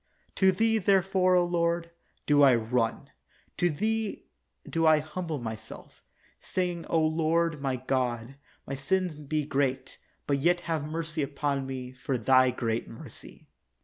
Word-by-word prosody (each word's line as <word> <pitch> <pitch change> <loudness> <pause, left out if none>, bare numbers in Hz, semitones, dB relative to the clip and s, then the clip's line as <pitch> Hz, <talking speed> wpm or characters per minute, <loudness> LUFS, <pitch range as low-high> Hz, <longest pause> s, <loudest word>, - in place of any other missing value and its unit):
To 190 -1 +5
Thee, 225 +4 +2
therefore, 190 -1 +3
O 175 -1 +4
Lord, 170 -1 0 0.3
do 145 -1 +4
I 135 -3 +7
run; 115 0 -1 0.5
to 175 - +2
Thee 220 +6 -2 0.4
do 165 -1 +1
I 155 -1 +7
humble 155 +1 -4
myself, 110 -3 -8 0.4
saying, 180 -2 -3
O 165 - +2
Lord 160 0 +1
my 135 -2 0
God, 125 -1 -2 0.3
my 135 - -5
sins 180 +6 0
be 150 0 -3
great, 135 -2 -1 0.3
but 140 -1 +1
yet 175 +4 +2
have 165 -3 -2
mency 160 +1 -3
upon 140 -1 -2
me 130 -1 -5
for 130 0 -3
Thy 130 +2 +4
great 115 -2 -2
mercy. 115 - -12
150 Hz, 145 wpm, -28 LUFS, 130-175 Hz, 0.5 s, I